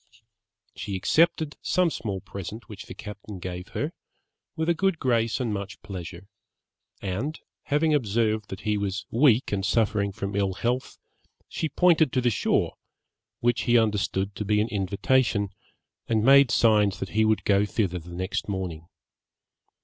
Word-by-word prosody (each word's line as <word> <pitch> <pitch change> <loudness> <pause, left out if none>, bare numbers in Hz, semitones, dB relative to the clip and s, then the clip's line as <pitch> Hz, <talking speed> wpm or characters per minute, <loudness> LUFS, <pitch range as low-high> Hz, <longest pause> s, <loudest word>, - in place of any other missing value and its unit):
She 100 -2 -4
accepted 160 - +2
some 180 -2 +2
small 100 -8 -4
present 100 +5 -8
which 105 -2 -10
the - - -8
captain 105 -1 -8
gave 90 +1 -6
her, 150 +3 -1 0.6
with 160 -1 -1
a 170 - +4
good 190 0 +1
grace 115 -5 +1
and 120 -4 -1
much 100 -1 -5
pleasure; 90 -1 -8 0.8
and 110 - -3 0.3
having 150 +2 +2
observed 110 -4 +1
that 95 +1 -7
he 105 -1 0
was 100 -1 -3
weak 125 0 +4
and 100 -1 -1
suffering 105 -1 +1
from 100 +1 -5
ill 100 -1 +1
health, 120 +7 -2 0.5
she 160 - -3
pointed 160 -2 +4
to 130 - +2
the 120 -1 +2
shore, - - 0 0.6
which 120 0 +2
he 120 -1 +5
understood 100 -3 0
to - - -2
be 105 +1 +2
an 110 +2 +1
invitation, 100 +2 +1 0.6
and 110 -2 +1
made 140 0 +7
signs 105 -5 +3
that - - -4
he 110 +1 +2
would 110 0 +2
go 100 0 +3
thither 100 -4 -1
the 85 +1 -13
next 95 +3 -3
morning. 90 -4 -4
105 Hz, 155 wpm, -26 LUFS, 100-125 Hz, 0.8 s, made